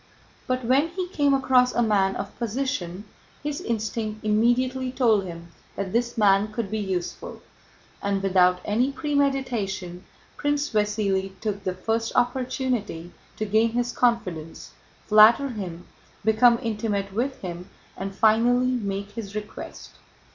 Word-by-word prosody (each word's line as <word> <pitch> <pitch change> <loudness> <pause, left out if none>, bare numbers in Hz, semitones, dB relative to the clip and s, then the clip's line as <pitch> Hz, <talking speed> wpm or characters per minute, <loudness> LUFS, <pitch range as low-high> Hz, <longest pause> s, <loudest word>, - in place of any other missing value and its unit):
But 255 -1 -1
when 270 +6 +3
he 360 +2 -4
came 285 -5 +2
across 255 -2 +3
a 240 - +3
man 195 -3 +2
of - - -6
position 215 -6 -3 0.4
his 295 -1 -3
instinct 220 -1 -3
immediately 250 +4 +2
told 225 -6 +2
him 170 -1 -9 0.3
that 190 -2 -4
this 235 +1 0
man 205 0 +4
could 215 -2 -4
be 220 - -1
useful, 190 - -4 0.6
and 200 -1 -1
without 180 -1 +3
any 240 +6 +1
premeditation 260 - -1 0.3
Prince 290 0 0
Vasíli 200 -3 0
took 205 -2 -3
the 185 -1 -2
first 225 +4 -2
opportunity 245 - -1 0.3
to 215 - -2
gain 220 +2 +2
his 245 0 0
confidence, 185 -10 -1 0.3
flatter 225 +6 +6
him, 180 -7 -6 0.4
become 235 +2 +5
intimate 210 -3 -2
with 260 +5 -2
him, 180 0 -7 0.3
and 195 +1 -5
finally 240 +4 +3
make 200 -4 -3
his 205 -2 -7
request. 210 0 -7
220 Hz, 135 wpm, -25 LUFS, 195-250 Hz, 0.6 s, flatter